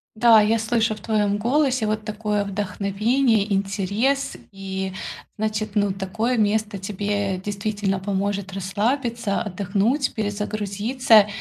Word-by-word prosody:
Да, 225 -1 +7
я 215 +2 +3
слышу 225 -1 +1
в - - -12
твоем 205 -1 +1
голосе 255 +1 +1
вот 215 0 -1
такое 210 -1 -1
вдохновение, 205 +3 +1
интерес, 200 +8 0 0.2
и 190 -1 -4 0.5
значит, 215 0 -2
ну, 205 -1 +2
такое 195 +6 -1
место 210 -1 +1
тебе 200 0 -2
действительно 200 0 -2
поможет 200 0 -2
расслабиться, 215 +3 -1
отдохнуть, 210 +6 0
перезагрузиться. 210 +2 +2
210 Hz, 110 wpm, -23 LUFS, 200-225 Hz, 0.5 s, Да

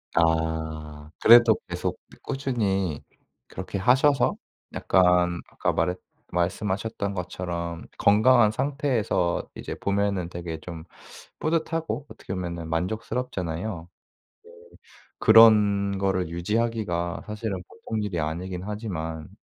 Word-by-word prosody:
아. 80 -2 -1
그래도 115 -1 +8
계속 - - -3 0.2
꾸준히 100 - -1 0.5
그렇게 - - -6
하셔서 130 +7 +3 0.4
약간 90 -1 +3
아까 - - -1
말했 90 +2 0 0.3
말씀하셨던 100 +3 -1
것처럼 85 -2 -4
건강한 110 +2 +5
상태에서 130 - 0
이제 - - -6
보면은 100 -3 0
되게 85 -2 -6
좀 85 -2 -8 0.6
뿌듯하고 160 -2 -1
어떻게 - - -8
보면은 85 -3 -4
만족스럽잖아요. 90 -1 -3 0.6
네 450 - -16 0.7
그런 105 -3 +6
거를 95 -3 0
유지하기가 90 -1 -1
사실은 105 -3 -4
보통 110 -2 -4
일이 95 -5 -2
아니긴 90 +4 -3
하지만 90 -6 -5
95 Hz, 260 characters per minute, -25 LUFS, 85-110 Hz, 0.7 s, 그래도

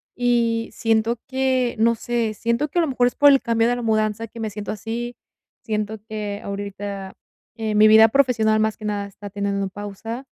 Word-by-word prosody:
y 235 -2 +1
siento 225 +1 +1
que, 260 -2 0
no 230 +1 +4
sé, 230 -1 -2
siento 235 +7 -1
que 345 - 0
a - - +5
lo 325 - +1
mejor 250 -2 +2
es 245 - -3
por 290 0 +6
el 275 -1 +5
cambio 230 0 +1
de 245 - +1
la 245 - -4
mudanza 215 0 0
que 230 +2 -12
me 220 -1 -2
siento 205 0 -6
así, 230 +3 -5 0.5
siento 215 -1 -2
que 210 -2 -4
ahorita, 200 -1 -6 0.4
eh, 220 -1 -2
mi 215 +1 +7
vida 220 +1 +8
profesional 225 -4 +2
más 220 0 0
que 215 - -9
nada 205 -1 -2
está 200 +1 -10
teniendo 200 -1 -2
pausa, 205 +5 -7
220 Hz, 195 wpm, -22 LUFS, 210-240 Hz, 0.5 s, vida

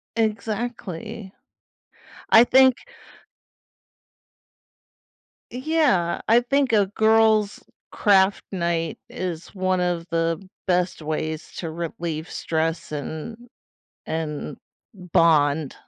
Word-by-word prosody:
Exactly. 220 -2 -3 1.0
I 225 - +8
think 260 0 +5 2.8
Yeah, 255 - +1
I 230 +2 +5
think 270 0 +1
a 205 -2 +4
girls' 220 0 +2 0.3
craft 195 -2 +3
night 170 -3 -2
is 180 0 -6
one 185 -1 0
of 175 -2 -1
the 165 +3 -1 0.2
best 180 -2 0
ways 155 +1 -4
to 165 -3 -5
relieve 165 -1 -5
stress 165 0 -2
and 160 - -6 0.6
and 155 -2 -4 0.4
bond. 160 -5 +2
185 Hz, 85 wpm, -23 LUFS, 165-220 Hz, 2.8 s, I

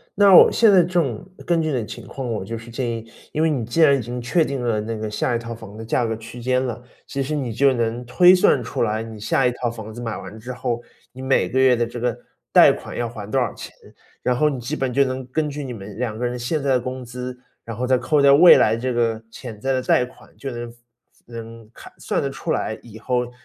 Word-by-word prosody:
那 205 - +5
让 190 - +9
我 - - +9
现 225 -2 +5
在 190 -2 +7
正 165 -10 -1 0.2
根 170 -1 +2
据 160 - -1
你 - - -1
的 120 -4 -2
情 - - -9
况， 135 - -6
我 105 -4 -3
就 115 +3 -5
是 115 +1 -11
建 120 0 -2
议， 115 -1 -4 0.3
因 155 - +1
为 160 - +3
你 135 -7 -1
既 120 +9 0
然 145 -3 +6
已 - - -3
经 120 +2 -5
确 160 +7 +2
定 140 -3 -3
了 115 -3 +1
那 115 +2 -4
个 110 -1 -5
下 120 +3 -1
一 - - 0
套 115 0 -6
房 105 -3 -11
的 110 - -7
价 120 +2 0
格 115 0 -2
区 115 +2 -10
间 130 +1 +1
了， 120 -1 -5 0.2
其 140 - -4
实 145 +3 -2
你 130 -5 -2
就 135 +3 +3
能 120 0 -2
推 175 +9 +6
算 160 -8 +3
出 115 - -2
来， 110 0 -1
你 110 -1 -9
下 125 +5 +1
一 125 - +3
套 120 0 -3
房 110 -2 -8
子 120 - -8
买 115 -2 -3
完 100 +4 -9
之 125 +3 -7
后， 120 -1 -3 0.3
你 130 - -11
每 130 0 +1
个 130 - 0
月 130 -1 +5
的 120 0 0
这 120 +1 -7
个 120 -1 -1 0.4
贷 - - +8
款 - - -7
要 120 -1 -2
还 105 -3 -8
多 135 - +1
少 125 -4 -1
钱。 - - -10 0.5
然 125 - +1
后 150 +4 +3
你 135 -3 -4
基 130 +6 -3
本 135 -4 -2
就 140 - +4
能 130 0 -4
根 150 +3 -1
据 145 0 -5
你 130 - -6
们 100 -2 -9
两 115 -4 -2
个 125 - -2
人， 125 0 -2
现 135 +6 -2
在 140 - +1
的 130 - +3
工 130 +1 -5
资， 125 +1 -7 0.3
然 115 - -6
后 125 +4 -2
再 130 0 +4
扣 140 +4 +1
掉 140 0 +7
未 170 +4 +9
来 110 - +3
这 125 +2 -2
个 115 -2 0
潜 115 -3 -9
在 135 +5 -1
的 130 - 0
贷 125 - +3
款， 125 - -18
就 135 - -6
能 120 -1 -7 0.5
能 115 -1 -10
看 - - -13
算 - - -2
得 - - -2
出 - - -5
来， - - -1
以 110 -2 -12
后 125 +1 -1
125 Hz, 295 characters per minute, -22 LUFS, 115-135 Hz, 0.5 s, 让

